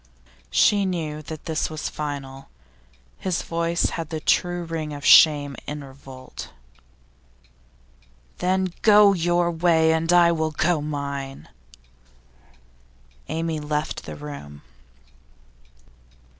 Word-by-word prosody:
She 200 - +3
knew 160 -5 -3
that 155 0 -9
this 160 -1 -1
was 155 -1 -4
final. 140 -3 -6 0.7
His 185 -3 -2
voice 170 0 -1
had 165 -2 -5
the 160 -2 -4
true 175 +2 +1
ring 160 -2 -4
of 145 - -8
shame 145 -3 +6
in 150 -1 -5
revolt. 135 -1 -11 1.9
'Then 185 0 0
go 210 -2 +6
your 175 -1 +1
way, 160 -1 +3
and 165 +1 0
I 175 -1 +6
will 160 -1 0
go 155 +1 0
mine!' 140 -2 -5 1.8
Amy 160 0 -2
left 150 0 -3
the - - -7
room. 105 - -9
160 Hz, 105 wpm, -23 LUFS, 145-170 Hz, 1.9 s, shame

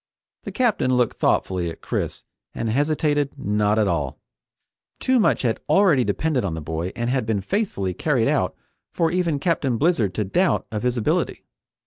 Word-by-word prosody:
The - - -4
Captain 220 - +1
looked 125 -2 +1
thoughtfully 90 -2 +1
at 80 - -9
Chris - - -3 0.3
and 115 - -2
hesitated 145 +1 0
not 105 -2 +1
at 105 -2 +3
all. 75 -5 -2 0.8
Too 260 -1 +2
much 210 - +2
had 115 -3 0
already 185 -10 +4
depended 150 0 0
on 90 -5 -2
the - - -4
boy 80 +3 -4
and 120 0 -2
had 130 -1 +1
been 110 -3 +1
faithfully 100 - -1
carried 125 - +1
out - - +1 0.4
for 165 -1 +1
even 175 -4 0
Captain 140 -5 0
Blizzard 120 - +1
to 110 - 0
doubt 175 - +1
of 105 -1 -3
his 125 0 0
ability. 110 - -1
125 Hz, 170 wpm, -23 LUFS, 100-160 Hz, 0.8 s, already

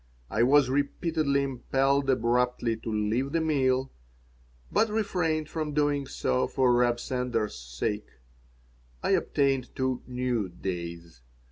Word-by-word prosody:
I 105 - +1
was 135 +2 +5
repeatedly 140 0 +1
impelled 135 +1 +1
abruptly 125 -1 +1
to 110 0 -6
leave 110 +6 0
the 165 - +2
meal, 135 -4 +1 0.8
but 225 - +3
refrained 180 -8 0
from 155 -2 -4
doing 145 -2 +1
so 125 - 0
for 130 -2 +2
Reb 120 0 +3
Sender's 125 -4 -2
sake. 60 - -4 1.0
I - - +1
obtained 135 -3 +1
two 130 -1 -1
new 125 -5 -1
"days." 85 -5 -6
130 Hz, 120 wpm, -28 LUFS, 115-140 Hz, 1.0 s, was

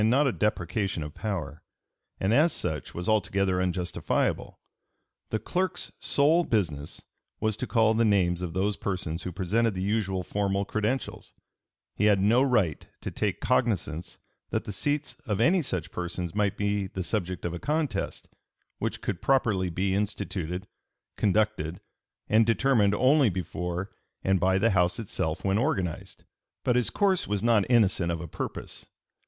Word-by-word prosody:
291) 115 +5 +4
not 135 - +1
a - - -16
deprecation 100 -3 0
of 75 0 -7
power, 85 -9 -4 0.6
and 95 +3 +1
as 155 +6 +5
such 75 -3 -4
was 90 +1 -3
altogether 95 -3 +2
unjustifiable. 90 -1 -1 0.7
The 110 - 0
clerk's 180 - -2
sole 155 +5 +3
business 80 - -2 0.4
was 110 -1 0
to 125 - -3
call 110 -2 +3
the 115 +1 +2
names 90 -5 +2
of 90 -3 -4
those 100 +3 0
persons 85 -4 -3
who 90 - -4
presented 105 +5 +1
the 90 - -3
usual 95 -3 0
formal 100 +1 -1
credentials; 110 +6 -2 0.6
he 105 - +1
had 105 -2 +5
no 110 +6 +4
right 110 - +1
to - - -4
take - - -2
cognizance 95 -9 0 0.3
that - - -1
the - - -5
seats 145 +8 -1
of 105 -3 0
any 170 +10 +4
such 90 - -3
persons 90 -1 -4
might 105 -1 0
be 100 -1 0
the 95 0 -4
subject 90 -3 -2
of 85 - -2
a 85 - -4
contest, 150 - -2 0.5
which - - -2
could - - -3
properly 110 -9 +2
be 95 +3 0
instituted, 95 -3 -2 0.5
conducted, 100 -5 +1 0.5
and 110 +1 +4
determined 115 -4 +3
only 135 +1 +4
before 90 0 -4 0.3
and 95 -1 +2
by 95 +1 +3
the 115 +4 +3
House 90 -2 +2
itself 95 -5 -3
when 95 +2 +2
organized. 95 - -2 0.4
But 125 - +2
his 125 -1 +2
course 195 -3 +1
was 105 0 -1
not 115 -3 +3
innocent 100 -8 +3
of 85 - -2
a 85 - -6
purpose. - - -6
100 Hz, 160 wpm, -27 LUFS, 90-115 Hz, 0.7 s, as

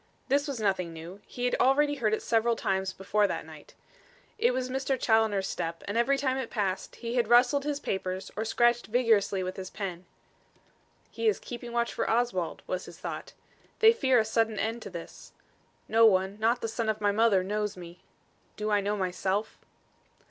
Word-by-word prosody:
This 285 +3 +2
was 275 -4 -4
nothing 190 -5 0
new. 170 +5 -10
He 245 - -4
had 245 - +1
already 290 +3 +4
heard 235 -7 0
it - - -8
several 230 0 +2
times 190 -2 -1
before 205 +2 +1
that - - -4
night. - - -14 0.6
It 475 +3 +4
was 255 -1 -2
Mr. 265 0 -1
Challoner's 220 -4 +2
step, 165 0 -4
and 205 - -3
every 240 +4 +3
time 265 -1 0
it 260 -4 -3
passed, 195 -4 -2
he 235 0 -5
had 240 -3 +1
rustled 250 +4 +4
his 290 -1 -1
papers 190 -5 -3
or 215 - -2
scratched 240 +2 +2
vigorously 215 -5 +2
with 185 0 -5
his 185 -1 -6
pen. 185 -3 -6 1.1
"He 455 - -2
is 430 - +3
keeping 240 0 -8
watch 235 0 0
for - - -1
Oswald," 225 -8 0
was 185 0 -3
his 175 - -12
thought. - - -6 0.4
"They 445 +1 +7
fear 265 - +3
a 220 - +3
sudden 220 0 +1
end 225 +3 -2
to - - -7
this. 170 -3 -10 0.5
No 225 0 +6
one, 190 0 +1
not 230 +3 +2
the - - -1
son 225 0 -2
of 215 0 -1
my 205 -1 +2
mother 205 -3 +3
knows 210 +1 -2
me. 175 0 -11 0.6
Do 215 0 -2
I 205 -1 +3
know 205 +1 -1
myself?" 190 +2 -1
220 Hz, 190 wpm, -28 LUFS, 195-245 Hz, 1.1 s, They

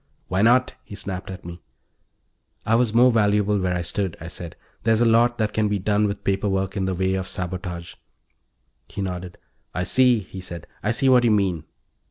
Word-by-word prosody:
"Why 95 +1 +1
not?" 125 +3 +4
he 100 - -10
snapped 95 -1 -6
at 95 -2 -8
me. 85 0 -8 1.0
"I 110 - +1
was 115 -1 +3
more 125 +3 +5
valuable 105 -2 +2
where 90 -1 0
I 90 - -2
stood," 95 +1 -2
I 80 - -7
said. 85 -1 -8 0.3
"There's 115 0 +2
a - - +5
lot 120 +1 +4
that 110 -1 -1
can 110 -1 +1
be 105 0 0
done 105 +2 +1
with 100 0 -5
paper 100 +1 0
work 95 0 -1
in 95 -2 -1
the 95 -1 -1
way 95 +1 0
of 95 -1 -2
sabotage." 90 -2 -5 0.9
He 100 +5 -5
nodded. 90 -1 -5 0.4
"I 90 - 0
see," 125 +5 +4
he 95 0 -9
said. 85 -2 -8 0.2
"I 105 - -1
see 115 +4 +1
what 125 -2 +6
you 120 - +4
mean." 95 -7 +1
100 Hz, 205 wpm, -23 LUFS, 90-110 Hz, 1.0 s, what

